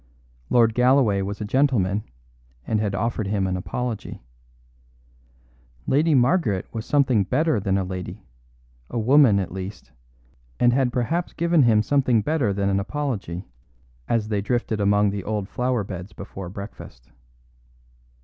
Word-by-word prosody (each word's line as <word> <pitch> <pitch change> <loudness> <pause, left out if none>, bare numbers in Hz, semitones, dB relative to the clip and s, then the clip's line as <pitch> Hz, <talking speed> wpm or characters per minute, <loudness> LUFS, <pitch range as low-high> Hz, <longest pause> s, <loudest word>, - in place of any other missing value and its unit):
Lord 115 -2 +4
Galloway 125 -4 +3
was 100 +2 -4
a - - -2
gentleman, 105 -5 +1 0.6
and 110 - 0
had 100 -2 -1
offered 110 0 -1
him 100 -1 0
an 95 -1 -1
apology. 110 - -5 1.6
Lady 150 +3 +3
Margaret 125 - +2
was 115 +1 -5
something 130 -7 +3
better 150 - +1
than 95 -1 0
a 95 - 0
lady, 90 -1 -7 0.6
a - - -4
woman 125 -1 +5
at 95 -3 -2
least, 95 +2 -7 0.7
and 120 0 +4
had 130 -1 +2
perhaps 160 +9 -1
given 170 -1 +2
him 110 -4 +4
something 130 -4 +2
better 150 -7 +1
than 100 0 -1
an 100 0 +1
apology, 100 - -4 0.6
as 110 -2 0
they 105 -2 0
drifted 110 0 -1
among 100 0 +3
the 100 -1 -4
old 105 -2 -3
flowerbeds 105 -6 -3
before 95 -2 -8
breakfast. 95 - -10
110 Hz, 140 wpm, -23 LUFS, 100-125 Hz, 1.6 s, woman